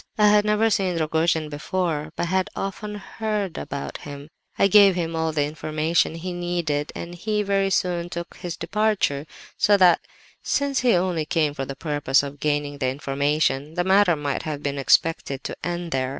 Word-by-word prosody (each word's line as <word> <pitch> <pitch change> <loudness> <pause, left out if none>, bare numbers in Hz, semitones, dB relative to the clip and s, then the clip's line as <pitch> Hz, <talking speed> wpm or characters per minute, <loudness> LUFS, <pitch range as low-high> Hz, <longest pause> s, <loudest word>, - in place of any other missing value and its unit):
I 210 -1 +5
had 210 0 +4
never 210 +1 +2
seen 190 -4 +1
Rogojin 160 0 +1
before, 155 0 -2
but - - -1
had 185 +2 0
often 210 +2 -4
heard 210 -2 -3
about 140 -1 -5
him. 145 0 -9 0.3
"I - - +4
gave 200 -2 +6
him 165 -2 -2
all 160 0 0
the 150 -2 +1
information 155 +2 0
he 175 +2 -5
needed, 175 -4 -2
and 170 +1 -6
he 210 +4 -1
very 195 -1 +1
soon 175 -2 0
took 170 0 -7
his 175 -2 -6
departure; 205 -9 0 0.3
so 205 -1 +5
that, 180 -3 +5 0.4
since 280 -1 0
he 245 -5 +3
only 175 -3 0
came 155 -2 +1
for 135 -2 -4
the 135 - -6
purpose 145 -2 +1
of 140 0 -7
gaining 145 -1 -1
the 130 - 0
information, 140 +2 -1
the 175 - +1
matter 190 -1 +4
might 145 -2 -2
have 150 -2 -5
been 140 0 -2
expected 140 -1 +2
to - - -5
end 175 0 -3
there. 130 -1 0
165 Hz, 180 wpm, -23 LUFS, 145-190 Hz, 0.4 s, gave